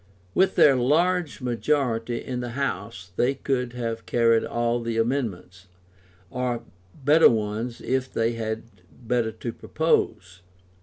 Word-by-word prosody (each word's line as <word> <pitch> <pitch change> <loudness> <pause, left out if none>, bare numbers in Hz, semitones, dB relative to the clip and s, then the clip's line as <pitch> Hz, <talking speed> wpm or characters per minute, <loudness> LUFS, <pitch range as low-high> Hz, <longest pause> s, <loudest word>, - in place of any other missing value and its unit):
With 190 - +3
their 140 -3 +6
large 160 +6 +1
majority 120 -2 -1
in 125 -1 -3
the 120 -1 -5
House 100 -8 -3
they 130 +3 +2
could 125 -3 -2
have 115 -2 -4
carried 115 -1 +3
all 120 0 0
the 115 -1 -3
amendments, 110 -7 -2 0.6
or 125 -2 -2 0.4
better 155 +3 +7
ones 110 +1 -2
if 130 0 -1
they 115 +1 +1
had 110 -1 -3 0.3
better 120 -2 -1
to 115 +1 -6
propose. 95 - -1
120 Hz, 125 wpm, -25 LUFS, 115-130 Hz, 0.6 s, better